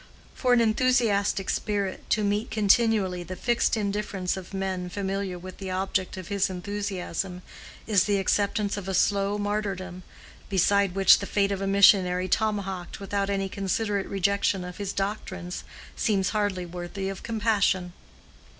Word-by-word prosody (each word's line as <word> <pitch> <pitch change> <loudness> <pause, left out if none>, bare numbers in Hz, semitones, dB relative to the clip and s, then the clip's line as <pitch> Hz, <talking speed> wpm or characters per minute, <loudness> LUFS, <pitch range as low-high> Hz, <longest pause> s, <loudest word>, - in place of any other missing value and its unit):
For 255 - 0
an 245 -1 +5
enthusiastic 220 -4 +2
spirit 200 -3 -2
to 215 - +2
meet 205 +2 0
continually 210 -3 +2
the 180 +2 -6
fixed 240 +2 +1
indifference 200 -3 -2
of 190 -2 -8
men 190 -2 -3
familiar 195 -1 -3
with 185 +1 -10
the 190 -1 -5
object 185 0 -1
of 185 -2 -7
his 200 -1 0
enthusiasm 185 -1 -4 0.4
is 205 -4 +3
the 205 -1 +2
acceptance 200 +1 0
of 195 -2 -6
a 190 - -1
slow 200 +2 +2
martyrdom, 200 -3 -3 0.5
beside 200 0 +2
which 195 -1 +7
the 200 - -5
fate 200 -1 +1
of 195 -1 -2
a 195 - -1
missionary 190 -2 +5
tomahawked 195 -3 -1
without 200 0 -2
any 195 -1 0
considerate 200 +1 -1
rejection 200 -1 +1
of 180 0 -8
his 200 -2 -3
doctrines 190 -3 -4 0.3
seems 195 -4 +1
hardly 205 -4 -1
worthy 175 +3 -5
of 195 0 -5
compassion. 205 -5 +1
195 Hz, 150 wpm, -26 LUFS, 185-205 Hz, 0.5 s, which